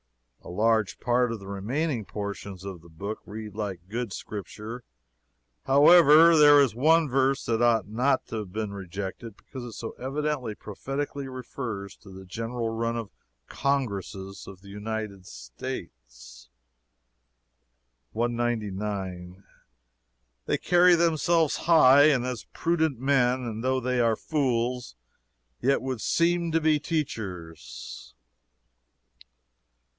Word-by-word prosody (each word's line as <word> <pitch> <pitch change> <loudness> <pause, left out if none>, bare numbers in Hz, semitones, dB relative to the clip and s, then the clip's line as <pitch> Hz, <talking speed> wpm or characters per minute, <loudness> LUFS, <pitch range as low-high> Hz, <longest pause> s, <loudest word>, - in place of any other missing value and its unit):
A - - -10
large 105 +1 +1
part 120 0 +1
of 115 - -4
the 100 - -12
remaining 115 +7 -2
portions 100 -2 -6
of 95 -4 -7
the 85 - -17
book 100 +7 -6
read 105 0 -7
like 100 -4 -5
good 115 +1 -4
Scripture, 105 +5 -7 0.8
however. 160 +3 +7
There 145 -1 +8
is 135 -5 +3
one 155 +6 +4
verse 135 +1 +1
that 115 0 0
ought 115 -3 +3
not 125 +5 +1
to 115 - -5
have 105 -4 -6
been 105 0 -3
rejected, 100 +3 -7
because 130 -2 -10
it 120 -2 -8
so 115 - -6
evidently 135 -3 -2
prophetically 135 +7 -5
refers 115 -6 -6
to 100 - -16
the 95 0 -11
general 115 +4 -4
run 115 +1 -2
of 115 -3 -6 0.4
Congresses 100 -8 -3
of 95 -1 -11
the 100 - -14
United 105 -2 -5
States: - - -9 1.6
"199. 105 -6 -3 1.0
They - - +1
carry 180 0 +5
themselves 165 -1 +2
high, 145 -4 +6
and 135 -5 +3
as 125 -4 -4
prudent 160 -6 0
men; 130 -1 +2
and 115 -1 -5
though 130 0 +1
they 125 0 -1
are 115 -2 +3
fools, 125 - -1 0.7
yet 135 0 +2
would 130 -4 -3
seem 170 0 +1
to 165 - +2
be 155 -1 +2
teachers." 90 - -5
115 Hz, 125 wpm, -27 LUFS, 100-135 Hz, 1.6 s, There